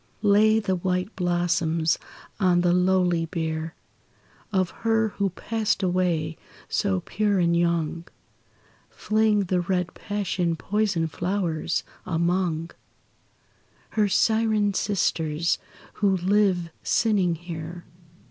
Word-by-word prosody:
Lay 215 +2 +5
the 190 -3 0
white 180 +3 -2
blossoms 170 -3 +1 0.4
on 180 -3 +3
the 175 0 +3
lowly 180 -2 +2
bier 160 -1 -3 0.8
Of 185 -3 +1
her 225 -1 +2
who 200 -1 -1
passed 215 +2 -2
away, 175 -4 0 0.3
so 195 -2 0
pure 205 +2 0
and 170 -2 +2
young, 170 -1 0 0.8
Fling 215 -1 +1
the 185 -1 0
red 180 0 -1
passion 190 -4 -2
poisoned 190 -4 -1
flowers 175 -2 -1 0.2
among 170 -1 0 1.2
Her 210 -2 +1
syren 220 0 +2
sisters 170 -5 0 0.3
who 195 -2 +2
live 185 -2 +2
sinning 195 -6 +2
here. 170 0 -7
180 Hz, 100 wpm, -25 LUFS, 170-205 Hz, 1.2 s, Lay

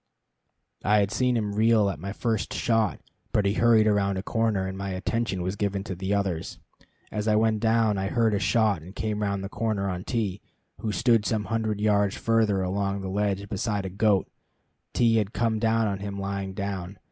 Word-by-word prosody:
I 105 +2 +4
had 100 -1 +2
seen 125 0 +1
him 105 -2 -2
reel 110 0 +4
at 95 -7 -3
my 100 +4 -5
first 110 0 -2
shot, 115 -4 +1 0.3
but 105 - +2
he 100 - +2
hurried 115 -1 +4
around 100 -2 +2
a 95 - -3
corner, 110 -4 0
and 95 0 -4
my 100 0 -4
attention 95 0 -2
was 95 +2 -2
given 100 -1 -1
to 95 -1 -4
others. 95 -5 -2 0.5
As 105 +1 -3
I 105 - +4
went 110 0 +2
down, 110 -2 +2
I 95 - -1
heard 115 0 +2
a 100 - +1
shot, 105 -2 +2
and 90 +5 -12
came 105 -1 -2
round 100 -1 -1
the - - -3
corner 105 -1 -2
on 90 -1 -3
T, 105 -5 -2 0.4
who 110 - -2
stood 115 0 +3
some 105 +1 0
hundred 110 -2 -1
yards 105 -1 +2
further 110 -4 +2
along 100 +1 -1
the 95 - -4
ledge 100 0 -1
beside 105 0 -2
a - - -3
goat. 100 0 +2 0.7
T 115 -2 +3
had 105 -1 -1
come 115 -2 0
on 110 -3 +1
him 100 0 -5
lying 100 -1 -4
down. 100 -1 -4
105 Hz, 195 wpm, -26 LUFS, 100-110 Hz, 0.7 s, I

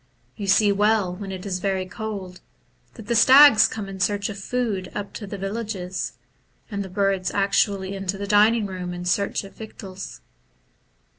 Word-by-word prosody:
You 200 - -5
see 205 +2 +4
well, 205 -2 +2
when 195 0 -7
it 185 0 -7
is 185 -2 -2
very 190 0 -1
cold, 195 -2 -7 0.5
that - - -10
the 235 +1 -1
stags 260 -1 +8
come 210 -3 -6
in 195 -1 -8
search 205 +2 0
of 200 -1 -6
food 210 -4 -2
up 205 -1 -5
to 205 - -7
the 200 - -6
villages, 195 -2 -4 0.6
and 200 -1 -2
the 190 - -8
hirds 195 -1 0
actu 200 0 +2
ally 190 -1 -6
into 195 0 -3
the 200 - -4
dining 210 +2 +4
room 180 -2 -5
in 175 0 -6
search 200 +4 0
of 195 - -12
victuals. 190 - -9
200 Hz, 175 wpm, -23 LUFS, 190-210 Hz, 0.6 s, stags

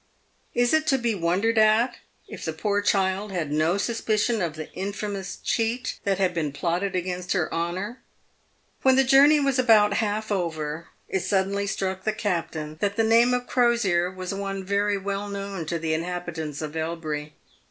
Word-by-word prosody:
Is 245 +2 +3
it 315 0 +2
to 270 - +4
be 235 -2 0
wondered 200 +5 +1
at 220 +3 +4 0.3
if - - -9
the 160 - -2
poor 205 +5 0
child 195 0 +1
had 165 -6 -2
no 155 +5 +2
suspicion 220 0 0
of 165 -3 -2
the 155 -1 -8
infamous 200 0 -4
cheat 230 +2 -1
that 195 -1 +1
had 185 -2 +1
been 155 -4 -1
plotted 175 +6 -1
against 180 0 -2
her 175 -5 -1
honour? 185 +8 -3 0.8
When 265 -1 +5
the 270 - +5
journey 280 +3 +6
was 275 -2 +1
about 215 -4 +5
half 215 0 -1
over, 160 -4 -2 0.2
it 190 - -1
suddenly 200 +1 0
struck 190 -1 -2
the 215 - 0
cap 195 -6 -1
tain 155 -1 -6
that 200 0 0
the 225 - +2
name 230 +2 +5
of 250 0 0
Crosier 235 -10 +2
was 185 0 -5
one 195 -1 -4
very 200 +1 +1
well 200 +1 -3
known 200 -4 -5
to 170 - -1
the 160 -1 -1
inhabi 175 +1 -3
tants 155 -2 -5
of 155 +1 -6
Elbury. 155 -2 -3
195 Hz, 180 wpm, -25 LUFS, 170-215 Hz, 0.8 s, journey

